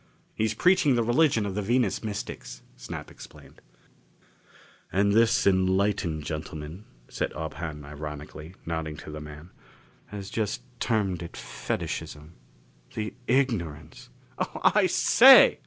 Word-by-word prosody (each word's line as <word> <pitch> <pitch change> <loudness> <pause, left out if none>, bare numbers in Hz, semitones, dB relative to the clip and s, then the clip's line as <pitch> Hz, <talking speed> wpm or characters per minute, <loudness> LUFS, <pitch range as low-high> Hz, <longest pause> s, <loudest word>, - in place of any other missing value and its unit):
"He's 110 0 -1
preaching 180 -7 +4
the 120 - +2
religion 120 -2 +3
of 100 - -3
the 105 - -2
Venus 115 0 +1
mystics," 105 - -6
Snap - - -8
explained. - - -14 1.3
"And 100 +1 +2
this 115 +2 +4
enlightened 95 -4 +1
gentleman," 75 +5 -6 0.2
said - - -3
Ob 80 0 -5
Hahn 75 -3 -6
ironically, 75 +3 -8
nodding 80 -2 -4
to 75 - -9
the 75 0 -7
man, 75 +3 -11 0.6
"has 100 -1 -8
just 110 +1 -2 0.2
termed 100 -7 0
it 85 - -8
fetishism. 75 +5 -5 0.6
The 110 0 -3
ignorance 85 - -1
" - - -31
"Oh, - - -3
I - - +4
say!" - - +7
95 Hz, 125 wpm, -27 LUFS, 75-110 Hz, 1.3 s, say